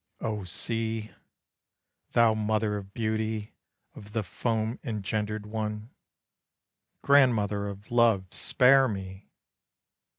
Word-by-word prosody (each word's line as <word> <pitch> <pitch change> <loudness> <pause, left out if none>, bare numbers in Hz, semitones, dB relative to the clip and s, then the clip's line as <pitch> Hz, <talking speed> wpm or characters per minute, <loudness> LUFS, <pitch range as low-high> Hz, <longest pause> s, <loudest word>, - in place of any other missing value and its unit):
O 105 -3 -3
sea. 110 +3 -2 1.0
Thou 115 -2 +5
mother 110 0 0
of 100 -1 -7
beauty, 110 -1 -2 0.4
of 105 0 -13
the 110 -1 0
foam 110 +3 -2
engendered 105 -2 -3
one, 105 +1 -4 1.1
Grandmother 110 -8 +3
of 100 +2 -9
love, 115 -5 +4
spare 135 +1 +4
me! 95 -2 -7
110 Hz, 95 wpm, -28 LUFS, 105-115 Hz, 1.1 s, Thou